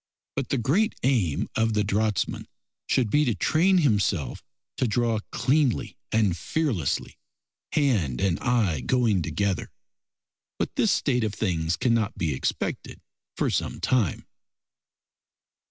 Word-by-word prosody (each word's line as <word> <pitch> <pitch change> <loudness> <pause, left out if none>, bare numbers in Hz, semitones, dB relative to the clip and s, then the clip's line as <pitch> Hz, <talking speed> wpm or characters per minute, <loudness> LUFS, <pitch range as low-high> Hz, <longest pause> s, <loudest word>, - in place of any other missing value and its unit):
But 135 -2 -2
the 140 - +1
great 175 - +1
aim 115 - +1
of 115 0 +1
the 105 0 +2
draughtsman 105 0 -1 0.4
should 120 -5 +1
be 150 - +4
to 120 -7 +1
train 175 - +3
himself 100 - +1 0.3
to 130 - +1
draw 115 0 +1
cleanly 135 0 +1 0.2
and 105 -5 +2
fearlessly, 110 - -2 0.5
hand 105 - +1
and 95 -3 +1
eye 110 - +1
going 110 - +1
together. 100 +3 -1 0.9
But - - -2
this - - +3
state 125 -1 +1
of 105 -2 -2
things 85 -5 -1
cannot 115 -4 +1
be 80 -4 0
expected 65 - -3 0.4
for - - +1
some - - -2
time. 120 -10 0
110 Hz, 125 wpm, -26 LUFS, 95-130 Hz, 0.9 s, be